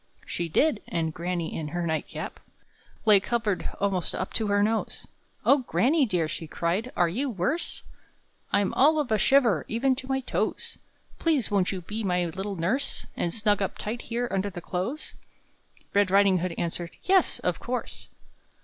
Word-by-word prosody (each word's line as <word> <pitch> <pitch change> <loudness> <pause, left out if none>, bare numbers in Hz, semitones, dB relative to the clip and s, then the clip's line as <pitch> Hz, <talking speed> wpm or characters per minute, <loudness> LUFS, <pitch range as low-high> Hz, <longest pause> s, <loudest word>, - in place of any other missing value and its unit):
She 170 -1 -3
did: 250 - +2
and 160 -2 -1
granny, 170 0 -3
in 155 - -3
her 175 +3 -2
night 160 -1 -1
cap, - - -6 0.7
Lay 210 -2 +7
covered 215 -2 -1
almost 195 -4 0
up 185 - -4
to 220 - 0
her 205 0 +3
nose. 220 +1 -1 0.4
"Oh, 280 - +6
granny 265 +3 +2
dear!" 175 -6 +1
she 160 +1 -5
cried, 180 +10 -1
"are 175 - +4
you 255 +12 -1
worse?" 245 - 0 0.7
"I'm 200 -1 +2
all 305 +4 +5
of 290 -6 -1
a 215 - +3
shiver, 235 - +4
even 260 +4 +1
to 260 - -7
my 265 0 0
toes! 255 - -2 0.4
Please 305 -10 +1
won't 195 -3 +2
you 190 -2 -4
be 210 +6 -5
my 180 -2 +1
little 190 +4 -4
nurse, 195 +12 -1
And 170 - -1
snug 205 0 +2
up 195 - -2
tight 225 +3 -4
here 240 +1 -2
under 195 +1 0
the 180 -2 -7
clothes?" 190 - -4 0.8
Red 200 -1 +4
Riding 195 -1 +5
hood 175 -1 -2
answered, 170 0 -3
"Yes," 375 0 +3
of - - -1
course. - - -4
200 Hz, 175 wpm, -27 LUFS, 175-245 Hz, 0.8 s, Lay